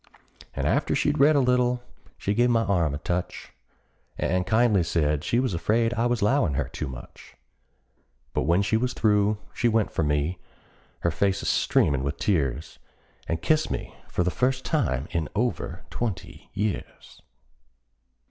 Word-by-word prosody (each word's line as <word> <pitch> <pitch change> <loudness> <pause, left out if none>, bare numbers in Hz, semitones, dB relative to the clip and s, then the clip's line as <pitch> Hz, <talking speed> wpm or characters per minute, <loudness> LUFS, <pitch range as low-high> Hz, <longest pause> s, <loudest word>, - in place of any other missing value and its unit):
And - - -2
after - - +1
she'd - - +1
read 150 +2 +6
a - - +5
little 125 -1 +2 0.3
she 100 - -1
give 120 +3 +3
my 115 -1 +3
arm 85 -9 +1
a - - -3
touch, 85 +3 -4 0.6
And 90 0 0
kindly 110 -2 +3
said 75 -3 0
she 120 - +1
was 130 -5 0
afraid 115 +7 +1
I 120 0 +1
was 120 -3 0
'lowin' 105 - +2
her - - -1
too 75 - -5
much; 60 -2 -11 1.0
But - - 0
when 85 +4 +3
she 110 +2 +1
was 125 +2 -1
through 105 -2 +2 0.2
she 120 - +1
went 110 -2 +1
for - - -1
me, 75 +3 0 0.6
her 85 - +1
face 95 +4 0
a - - -5
streamin' 70 -3 +2
with 70 +2 -2
tears, 75 - -1 0.5
And 80 - -2
kissed 155 0 +2
me - - -4 0.2
for 90 - 0
the 90 - 0
first 130 +4 0
time 75 - 0
in 80 -3 -2
over 120 +3 -2
twenty 110 -7 -5
years! 105 -2 -4
100 Hz, 165 wpm, -26 LUFS, 85-120 Hz, 1.0 s, read